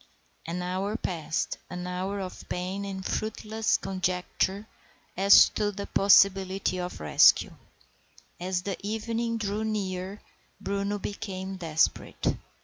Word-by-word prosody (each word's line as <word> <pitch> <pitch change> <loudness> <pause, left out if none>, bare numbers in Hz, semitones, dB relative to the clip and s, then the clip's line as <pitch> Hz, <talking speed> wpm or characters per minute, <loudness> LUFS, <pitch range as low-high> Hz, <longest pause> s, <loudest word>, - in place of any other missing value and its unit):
An 175 +2 -3
hour 190 +4 -2
passed, 160 -6 -3
an 180 0 -5
hour 185 +3 -3
of 185 -1 -8
pain 185 +3 -3
and 190 -1 -6
fruitless 220 0 -1
conjecture 190 +2 -2 0.5
as 195 +2 +7
to 205 -1 -1
the 200 0 -6
possibility 195 -1 +4
of 180 0 -5
rescue. 75 - +5 0.9
As 180 0 -2
the 195 -1 -3
evening 230 +2 -2
drew 210 0 -2
near 195 -2 -3 0.4
Bruno 200 +1 -2
became 195 -1 -5
desperate. 160 -3 0
195 Hz, 115 wpm, -28 LUFS, 180-205 Hz, 0.9 s, as